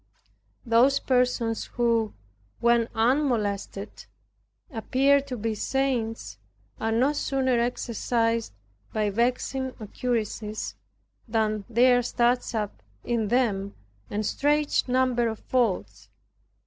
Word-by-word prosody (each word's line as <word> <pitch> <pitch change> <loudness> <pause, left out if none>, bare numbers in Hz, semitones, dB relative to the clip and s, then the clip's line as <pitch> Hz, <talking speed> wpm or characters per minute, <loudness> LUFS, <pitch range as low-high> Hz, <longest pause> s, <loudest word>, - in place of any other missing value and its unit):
Those 245 +4 +4
persons 250 -3 +1
who, 230 -3 +1 0.4
when 235 -1 +3
unmolested, 220 -5 0 0.7
appear 270 +4 +3
to 270 -2 -6
be 225 0 -1
saints 225 - -2 0.4
are 225 - -1
no 255 +6 +3
sooner 265 -4 +1
exercised 230 -1 0 0.4
by 210 -1 0
vexing 255 +4 -1
occurrences 215 - -3 0.5
than 215 -2 0
there 245 +1 +5
starts 240 0 +1
up 210 - -3 0.2
in 230 -3 0
them 205 -4 0 0.3
a 210 +1 -2
strange 295 +6 +1
number 250 -2 +2
of 220 -1 -3
faults. 235 -7 -1
235 Hz, 95 wpm, -26 LUFS, 220-255 Hz, 0.7 s, there